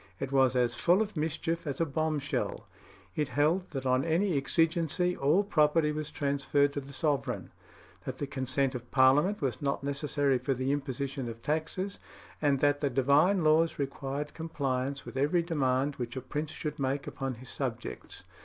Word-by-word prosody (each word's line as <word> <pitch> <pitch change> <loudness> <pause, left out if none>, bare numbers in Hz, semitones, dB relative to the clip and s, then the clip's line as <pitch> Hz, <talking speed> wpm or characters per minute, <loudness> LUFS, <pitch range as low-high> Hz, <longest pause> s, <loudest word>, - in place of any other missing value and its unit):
It 135 - -3
was 130 -2 +4
as 120 -1 +2
full 175 +9 +3
of 215 -2 -8
mischief 160 +1 -2
as 140 -2 -3
a 165 - +3
bomb 155 +1 -1
shell. 145 0 -3 0.5
It 150 -2 0
held 155 +6 +1
that 135 -3 -5
on 130 +1 +2
any 170 +2 +1
exigency 165 +5 +2
all 150 +9 +3
property 155 -4 +3
was 150 0 -4
transferred 140 0 +1
to 145 - -3
the 140 +1 -10
sovereign; 145 -1 -1 0.5
that - - -4
the - - -2
consent 135 0 0
of 120 -1 -7
Parliament 140 +10 +4
was 130 -4 -1
not 140 -1 -1
necessary 140 -1 +1
for 130 +2 -1
the 130 +2 -1
imposition 135 -2 -3
of 115 0 -9
taxes; 160 +6 -2 0.4
and 140 -3 +2
that 145 0 +3
the 145 - +1
divine 145 +9 +3
laws 160 +2 +3
required 140 +1 -3
compliance 140 -4 -2
with - - -7
every 150 +6 +2
demand 140 -4 0
which 120 0 -4
a 130 - -3
prince 150 +3 -4
should 150 -1 -5
make 135 +1 -1
upon 135 -2 -4
his 125 +2 -11
subjects. 120 -4 -5
140 Hz, 175 wpm, -30 LUFS, 135-155 Hz, 0.5 s, was